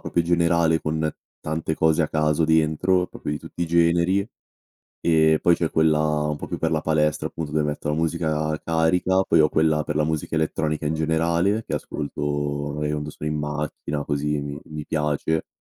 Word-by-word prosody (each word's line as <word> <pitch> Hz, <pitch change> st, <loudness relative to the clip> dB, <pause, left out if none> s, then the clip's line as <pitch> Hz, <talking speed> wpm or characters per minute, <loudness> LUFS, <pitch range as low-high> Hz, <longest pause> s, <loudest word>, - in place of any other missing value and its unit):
proprio 85 Hz, -, 0 dB
generale 85 Hz, -1 st, +2 dB
con 80 Hz, 0 st, -1 dB, 0.3 s
tante 80 Hz, 0 st, -3 dB
cose 80 Hz, +1 st, +2 dB
a 80 Hz, -, +1 dB
caso 75 Hz, 0 st, +1 dB
dentro, 80 Hz, +3 st, +2 dB
proprio 75 Hz, -, -5 dB
di 75 Hz, -, -3 dB
tutti -, -, -11 dB
i -, -, -1 dB
generi. 85 Hz, +4 st, +2 dB, 0.7 s
E 80 Hz, -1 st, +3 dB
poi 85 Hz, -1 st, +4 dB
c'è 85 Hz, -, 0 dB
quella 80 Hz, -1 st, +3 dB, 0.3 s
un 75 Hz, -, -1 dB
po' -, -, -7 dB
più -, -, -4 dB
per 80 Hz, -, 0 dB
la 80 Hz, -1 st, +1 dB
palestra 75 Hz, -1 st, +1 dB
appunto 80 Hz, -2 st, -5 dB
dove 75 Hz, 0 st, +1 dB
metto 75 Hz, 0 st, -3 dB
la 75 Hz, -, +1 dB
musica 80 Hz, -1 st, 0 dB
carica, 85 Hz, +3 st, +2 dB
poi 85 Hz, -, +3 dB
ho 75 Hz, -, +5 dB
quella 80 Hz, -1 st, +2 dB
per 75 Hz, 0 st, -4 dB
la 75 Hz, -, +2 dB
musica 80 Hz, 0 st, -2 dB
elettronica 75 Hz, -1 st, -1 dB
in 80 Hz, -, 0 dB
generale 85 Hz, +6 st, +1 dB
che -, -, -3 dB
ascolto 75 Hz, -1 st, -5 dB, 0.5 s
magari 75 Hz, 0 st, -2 dB
quando 75 Hz, 0 st, -3 dB
sono 75 Hz, -, -5 dB
in 75 Hz, -, -2 dB
macchina 75 Hz, 0 st, -3 dB
così 75 Hz, 0 st, -1 dB
mi 70 Hz, 0 st, -6 dB
mi 75 Hz, -1 st, -7 dB
piace. 75 Hz, +1 st, -1 dB
80 Hz, 190 wpm, -23 LUFS, 75-80 Hz, 0.7 s, ho